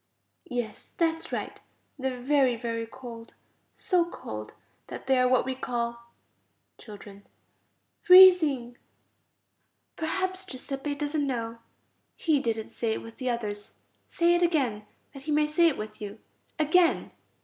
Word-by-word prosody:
Yes, 235 Hz, -3 st, -5 dB
that's 325 Hz, -1 st, 0 dB
right. -, -, -4 dB, 0.4 s
They 265 Hz, 0 st, -1 dB
are 250 Hz, -, -7 dB
very, 265 Hz, -1 st, +2 dB
very 230 Hz, -1 st, -4 dB
cold, 235 Hz, -2 st, -11 dB, 0.4 s
so 360 Hz, -2 st, +2 dB
cold 110 Hz, -, -8 dB, 0.3 s
that -, -, -8 dB
they 265 Hz, -1 st, +3 dB
are 255 Hz, -, +4 dB
what 255 Hz, 0 st, +3 dB
we 265 Hz, -, -2 dB
call... 235 Hz, -2 st, -4 dB, 0.7 s
Children. 200 Hz, -2 st, -12 dB, 0.7 s
Freezing. 320 Hz, -10 st, +7 dB, 1.2 s
Perhaps 375 Hz, +3 st, -2 dB
Giuseppe 275 Hz, -1 st, -5 dB
doesn't 290 Hz, 0 st, -1 dB
know. 230 Hz, -3 st, -3 dB, 0.6 s
He 310 Hz, -4 st, +1 dB
didn't 225 Hz, -4 st, -3 dB
say 225 Hz, -2 st, -1 dB
it -, -, -5 dB
with 230 Hz, 0 st, -12 dB
the 255 Hz, -1 st, -2 dB
others. 210 Hz, -4 st, -4 dB, 0.3 s
Say 340 Hz, 0 st, +2 dB
it 345 Hz, -, +2 dB
again, 260 Hz, -12 st, 0 dB, 0.3 s
that 275 Hz, -, -10 dB
he -, -, +1 dB
may 300 Hz, 0 st, +3 dB
say 310 Hz, +3 st, +3 dB
it 315 Hz, -, 0 dB
with 215 Hz, 0 st, -7 dB
you. 205 Hz, +1 st, -6 dB, 0.4 s
Again. 330 Hz, +3 st, +3 dB
255 Hz, 140 wpm, -27 LUFS, 230-310 Hz, 1.2 s, Freezing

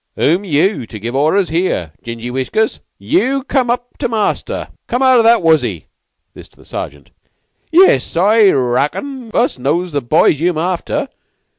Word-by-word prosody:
"Who'm 175 Hz, +7 st, +1 dB
yeou 170 Hz, -, 0 dB
to 110 Hz, -, -9 dB
give 115 Hz, +4 st, -5 dB
arders 160 Hz, +7 st, +2 dB
here, 165 Hz, -, -1 dB
gingy 115 Hz, +1 st, -6 dB
whiskers? 130 Hz, -, -1 dB, 0.2 s
Yeou 275 Hz, -5 st, 0 dB
come 260 Hz, -3 st, 0 dB
up 245 Hz, 0 st, -3 dB
to 255 Hz, -, 0 dB
the -, -, -11 dB
master. 220 Hz, -3 st, -2 dB, 0.2 s
Come 245 Hz, +3 st, -1 dB
out 260 Hz, -2 st, +5 dB
o' -, -, +6 dB
that 230 Hz, -3 st, +4 dB
wuzzy! 125 Hz, -, +1 dB, 0.4 s
[This -, -, -12 dB
is -, -, -21 dB
to -, -, -30 dB
the -, -, -19 dB
Sergeant.] 70 Hz, 0 st, -7 dB, 0.6 s
Yiss, 355 Hz, -, +4 dB
I 205 Hz, +3 st, +5 dB
reckon 150 Hz, -, -1 dB
us 235 Hz, -, +1 dB
knows 165 Hz, +7 st, -1 dB
the 145 Hz, -1 st, -1 dB
boys 145 Hz, +3 st, +2 dB
yeou'm 170 Hz, 0 st, 0 dB
after. 175 Hz, +2 st, -2 dB
175 Hz, 170 wpm, -16 LUFS, -, 0.6 s, o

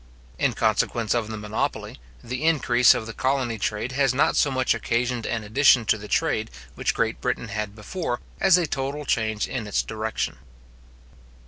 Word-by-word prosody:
In -, -, +2 dB
consequence 115 Hz, -3 st, +1 dB
of 120 Hz, -3 st, 0 dB
the 110 Hz, 0 st, -5 dB
monopoly, 105 Hz, -, -3 dB, 0.2 s
the 125 Hz, +4 st, -4 dB
increase 125 Hz, -6 st, +4 dB
of 120 Hz, -3 st, -3 dB
the 115 Hz, -, -7 dB
colony 130 Hz, -3 st, -1 dB
trade 105 Hz, +5 st, -2 dB
has 135 Hz, -1 st, +1 dB
not 140 Hz, -, +3 dB
so 145 Hz, -, +3 dB
much 130 Hz, -1 st, +1 dB
occasioned 120 Hz, 0 st, -1 dB
an 115 Hz, -2 st, -2 dB
addition 125 Hz, +2 st, +4 dB
to 110 Hz, -, +2 dB
the 105 Hz, -, -9 dB
trade 110 Hz, -8 st, 0 dB, 0.2 s
which -, -, -1 dB
Great -, -, -1 dB
Britain 115 Hz, -, -2 dB
had 105 Hz, 0 st, -4 dB
before, 120 Hz, -, -4 dB, 0.2 s
as 190 Hz, -2 st, +6 dB
a 175 Hz, -, +1 dB
total 145 Hz, 0 st, -3 dB
change 110 Hz, -4 st, 0 dB
in 120 Hz, -5 st, -4 dB
its 105 Hz, -, 0 dB
direction. 110 Hz, 0 st, -3 dB
120 Hz, 175 wpm, -24 LUFS, 110-135 Hz, 0.2 s, as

